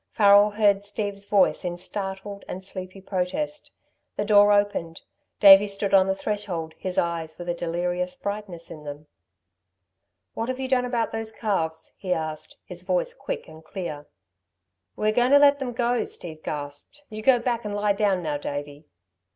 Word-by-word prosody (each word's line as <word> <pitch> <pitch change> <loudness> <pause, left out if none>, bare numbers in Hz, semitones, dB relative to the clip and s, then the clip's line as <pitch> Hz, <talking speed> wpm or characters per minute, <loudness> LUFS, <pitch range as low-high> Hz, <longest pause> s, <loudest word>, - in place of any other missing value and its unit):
Farrel 205 -1 +6
heard 205 -1 +2
Steve's 205 -1 -4
voice 200 -2 +3
in 175 -1 -3
startled 195 +2 -5
and 185 +1 -6
sleepy 185 0 -7
protest. 195 +12 -3 0.5
The 205 - -1
door 205 -1 +6
opened, 205 -5 0 0.4
Davey 200 0 +9
stood 200 0 -2
on 190 -1 +6
the 190 - +1
threshold 190 -6 -3
his 185 -1 -3
eyes 165 -2 -1
with 175 - -8
a 175 - 0
delirious 175 +1 -2
brightness 200 -4 -5
in 150 - -9
them. 145 +1 -8 1.3
"What 225 +2 -3
have 255 0 -3
you 265 - -2
done 255 -1 +2
about 240 -2 -1
those 225 0 -3
calves?" 165 -8 -2
he 185 -2 0
asked, 155 -2 -5
his - - -6
voice - - -1
quick - - -5
and 160 0 -13
clear. 160 -4 -6 0.9
"We 215 - +1
are - - +1
going 245 +4 +3
to - - +10
let 285 0 +5
'em 250 -2 -3
go," 240 0 +1
Steve 160 -3 -7
gasped. 145 - -6
"You 215 -1 -7
go 255 +2 +5
back 235 -1 -1
and 210 -1 -4
lie 205 0 +2
down 200 -3 +1
now, 150 -2 -1
Davey." 145 +1 -6
200 Hz, 175 wpm, -25 LUFS, 175-215 Hz, 1.3 s, to